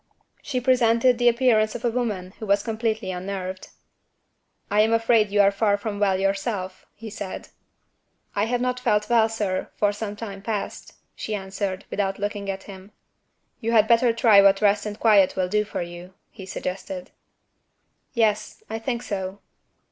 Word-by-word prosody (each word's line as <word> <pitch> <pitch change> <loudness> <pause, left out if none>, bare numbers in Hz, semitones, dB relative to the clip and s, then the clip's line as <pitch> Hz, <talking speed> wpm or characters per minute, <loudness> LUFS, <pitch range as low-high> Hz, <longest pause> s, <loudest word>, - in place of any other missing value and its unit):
She 260 -4 -2
presented 245 -1 +3
the 245 - +3
appearance 230 -3 +2
of 240 +1 -5
a 235 - +2
woman 210 -7 -3
who 220 - -6
was 200 0 +2
completely 220 -3 -2
unnerved. 185 0 -5 1.0
"I 210 +1 +4
am 220 +1 +3
afraid 225 -2 +3
you 205 +1 +4
are 200 0 +5
far 205 0 +1
from 205 0 -5
well 195 -2 +2
yourself," 195 -1 -2
he 220 0 -9
said. 200 -3 -7 0.9
"I 205 - +2
have 245 +1 -1
not 250 0 -1
felt 210 -2 0
well, 225 -2 +4
sir, 205 -4 -2
for 205 -1 +2
some 210 0 -5
time 200 -2 -7
past," 210 -1 -5 0.2
she 215 - -4
answered, 190 -1 -4
without 195 -1 -1
looking 205 -1 -4
at 190 0 -4
him. 195 +1 -12 0.7
"You 230 +1 -2
had 220 -1 +5
better 235 +1 +4
try 225 -3 +6
what 195 0 +5
rest 205 0 +2
and 210 0 -6
quiet 205 -4 +4
will 185 -1 0
do 210 +3 +1
for 210 - -4
you," 175 +2 -10 0.2
he 190 -4 -11
suggested. 185 0 -5 1.0
"Yes, 215 -2 0
I 225 - -3
think 240 +1 -3
so." 190 -3 -4
210 Hz, 170 wpm, -24 LUFS, 195-225 Hz, 1.0 s, try